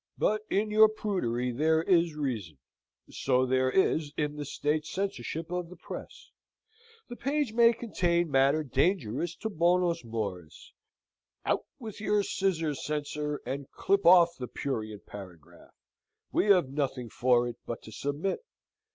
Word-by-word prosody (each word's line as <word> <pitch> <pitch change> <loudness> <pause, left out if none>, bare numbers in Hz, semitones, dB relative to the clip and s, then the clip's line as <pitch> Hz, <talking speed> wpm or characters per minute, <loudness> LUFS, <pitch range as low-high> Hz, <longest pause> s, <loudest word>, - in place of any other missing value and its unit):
But 215 0 +1
in 210 +2 0
your 215 0 +7
prudery 125 - -1
there 160 +5 +2
is 170 -3 +3
reason. 115 - -3 0.5
So 130 -1 +1
there 130 0 +2
is 155 -2 +2
in 150 -1 -1
the 145 -1 -5
state 150 +2 -1
censorship 165 -3 -4
of 180 -1 -3
the 180 - -11
Press. - - -9 0.8
The 240 - -7
page 280 -2 -1
may 230 0 +6
contain 175 -8 0
matter 140 +3 +3
dangerous 150 - 0
to 220 - -4
bonos 175 -1 +2
mores. 100 -8 -6 0.7
Out - - 0
with 220 -4 -8
your 210 -1 +2
scissors, 165 -8 -1
censor, 150 0 -3
and 135 +2 -4
clip 200 +1 +1
off 170 -1 +7
the 125 - -4
prurient 110 -7 -4
paragraph! 90 -6 -12 0.6
We - - +2
have 180 -9 +5
nothing 135 -4 -2
for 120 -1 +3
it 120 - -6
but 120 - -5
to 110 - -11
submit. 145 - -2
150 Hz, 140 wpm, -29 LUFS, 130-185 Hz, 0.8 s, your